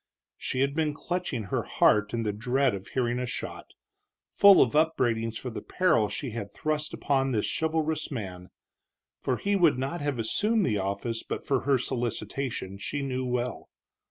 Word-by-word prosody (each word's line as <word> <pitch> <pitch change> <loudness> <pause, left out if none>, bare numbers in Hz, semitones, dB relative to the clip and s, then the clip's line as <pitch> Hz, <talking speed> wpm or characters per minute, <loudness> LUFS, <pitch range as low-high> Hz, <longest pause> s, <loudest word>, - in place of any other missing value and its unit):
She 130 - -1
had 140 +1 +2
been 155 -1 0
clutching 175 -9 -3
her 95 - -1
heart 105 0 +3
in 115 -1 -1
the 105 -2 -1
dread 125 +4 +1
of 95 -1 -6
hearing 120 -1 0
a 125 - -2
shot, - - -6 0.6
full 200 -1 +8
of 125 - +4
upbraidings 120 -8 +1
for 125 - -5
the 110 - -6
peril 160 - +2
she 135 -5 -4
had 105 -3 -5
thrust 155 -1 -2
upon 135 -2 0
this 105 - +1
chivalrous 160 -1 -1
man. 95 -8 -6 0.7
For 125 - -1
he 200 0 0
would 170 -8 +4
not 135 +6 -3
have 145 -3 -1
assumed 205 - +1
the 105 -2 +1
office 100 +4 -2
but - - -5
for 135 -2 +2
her 140 -1 +4
solicitation, 120 -4 -3
she 145 +7 -3
knew 130 -1 -2
well. 125 0 -2
130 Hz, 175 wpm, -28 LUFS, 115-150 Hz, 0.7 s, full